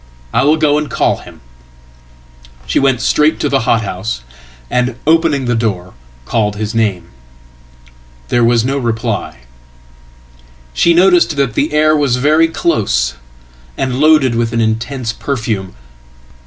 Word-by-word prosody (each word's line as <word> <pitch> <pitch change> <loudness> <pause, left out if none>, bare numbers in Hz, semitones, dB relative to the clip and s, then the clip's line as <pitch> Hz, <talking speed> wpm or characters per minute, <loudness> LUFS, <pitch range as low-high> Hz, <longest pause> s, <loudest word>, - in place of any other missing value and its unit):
I - - +2
will 155 +2 +3
go 150 -1 +2
and 150 - -5
call - - 0
him."She 60 0 -10
went 135 -3 +1
straight 150 +4 +2
to 145 - 0
the 135 - +2
hothouse, 105 - -1 0.5
and, 125 - -1
opening 160 -4 +2
the 120 - 0
door, 100 -6 -2 0.3
called 105 - -1
his 105 0 -4
name. 105 -6 -1 1.2
There 120 - +2
was 115 0 +2
no 135 +2 -1
reply. 115 - -3 1.3
She 170 - +3
noticed 175 -3 +4
that 135 -5 0
the 145 - 0
air 155 +1 +3
was 140 -5 +1
very 155 +5 +3
close, 100 - 0 0.6
and 130 -1 -2
loadedwith 130 -7 +3
an 115 - 0
intense 115 +2 -2
perfume. 110 - -4
120 Hz, 130 wpm, -14 LUFS, 100-145 Hz, 1.3 s, noticed